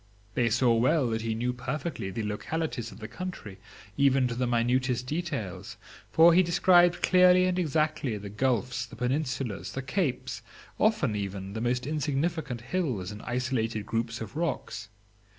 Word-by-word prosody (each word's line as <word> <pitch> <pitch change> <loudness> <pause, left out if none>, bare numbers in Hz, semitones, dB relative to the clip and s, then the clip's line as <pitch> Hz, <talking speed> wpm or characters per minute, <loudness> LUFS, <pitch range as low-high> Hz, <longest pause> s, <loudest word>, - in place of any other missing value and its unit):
They 120 -2 +2
saw 120 +1 +3
well 125 +3 +3
that 110 0 -1
he 110 0 -2
knew 120 +2 -1
perfectly 135 - -4
the 115 +3 -4
localities 120 +3 -3
of - - -12
the 110 - -7
country, 120 - -7 0.4
even 135 -2 +4
to 120 - -3
the 125 +1 -1
minutest 125 +1 +1
details; 145 - -4 0.3
for 165 +1 +7
he 180 - +6
described 175 0 +4
clearly 180 0 +6
and 185 0 0
exactly 155 -7 0
the 100 0 -8
gulfs, 125 +2 0
the - - -12
peninsulas, 125 -4 -2
the 135 - -4
capes, 130 - -2 0.4
often 210 - +2
even, 100 -1 -4
the 110 - -4
most 125 +1 0
insignificant 150 -2 -1
hills 125 - -2
and 105 +1 -8
isolated 120 -4 -1
groups 115 +1 -2
of 110 +4 -7
rocks. 140 -9 -3
125 Hz, 155 wpm, -28 LUFS, 115-155 Hz, 0.4 s, for